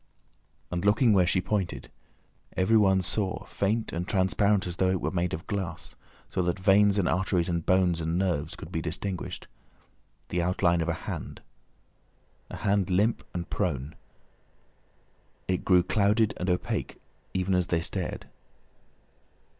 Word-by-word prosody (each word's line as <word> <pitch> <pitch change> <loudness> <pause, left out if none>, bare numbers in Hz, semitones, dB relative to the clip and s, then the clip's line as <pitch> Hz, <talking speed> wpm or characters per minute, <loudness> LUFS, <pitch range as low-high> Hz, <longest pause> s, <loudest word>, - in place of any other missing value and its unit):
And 90 0 -2
looking 105 +3 +4
where 90 -3 +4
she 95 - +2
pointed, 95 -1 -3 0.7
everyone 95 -1 +4
saw, 95 +1 -1
faint 110 +3 -1
and 85 +2 -3
transparent 95 +1 +2
as 90 -1 -5
though 95 - +2
it 95 -1 +1
was - - -2
made 90 -1 0
of 80 - -5
glass, 90 -4 -4 0.4
so - - 0
that 90 0 0
veins 100 +1 +4
and 95 - +2
arteries 95 -2 +1
and 85 -2 -1
bones 90 -2 +2
and 80 +2 -1
nerves 85 -5 -1
could 90 -2 -10
be 80 - -2
distinguished, 90 +3 -4 0.8
the 90 - 0
outline 85 -1 +2
of 80 - -1
a - - +2
hand, - - -5 1.1
a - - -7
hand 100 -3 +1
limp 105 +5 +2
and 85 -1 -5
prone. 70 +4 -2 1.5
It 90 -2 -1
grew 90 -2 +4
clouded 105 +3 +2
and 90 - -2
opaque 90 0 -2 0.4
even 95 +1 0
as 90 -1 +2
they 85 - +1
stared. - - -4
95 Hz, 145 wpm, -28 LUFS, 85-100 Hz, 1.5 s, looking